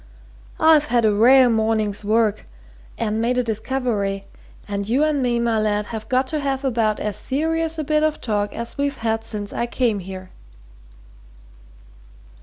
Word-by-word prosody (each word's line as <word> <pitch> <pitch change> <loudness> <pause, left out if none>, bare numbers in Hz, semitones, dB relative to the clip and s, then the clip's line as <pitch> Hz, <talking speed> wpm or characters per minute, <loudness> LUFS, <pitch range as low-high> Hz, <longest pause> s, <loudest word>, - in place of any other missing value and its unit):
"I've 315 -2 +5
had 240 -5 +2
a 215 - +3
rare 250 +5 +6
morning's 220 -2 0
work, 215 0 +1 0.5
and 220 -1 -1
made 245 +2 0
a 250 - +2
discovery, 220 -4 -2 0.4
and 200 0 -3
you 265 +6 +2
and 305 -2 +1
me, 245 -2 +1
my 235 -2 +1
lad, 210 -1 0
have 220 -1 -6
got 260 +1 +2
to 310 - -2
have 275 -1 -2
about 225 -4 +1
as 210 -2 -3
serious 325 +3 -1
a 310 - -2
bit 305 +1 +1
of 310 -1 0
talk 205 -3 -1
as 235 +4 -7
we've 280 -1 -1
had 225 0 -1
since 210 -2 -5
I 235 - -2
came 235 -4 0
here." 185 0 -9
230 Hz, 165 wpm, -21 LUFS, 210-270 Hz, 0.5 s, rare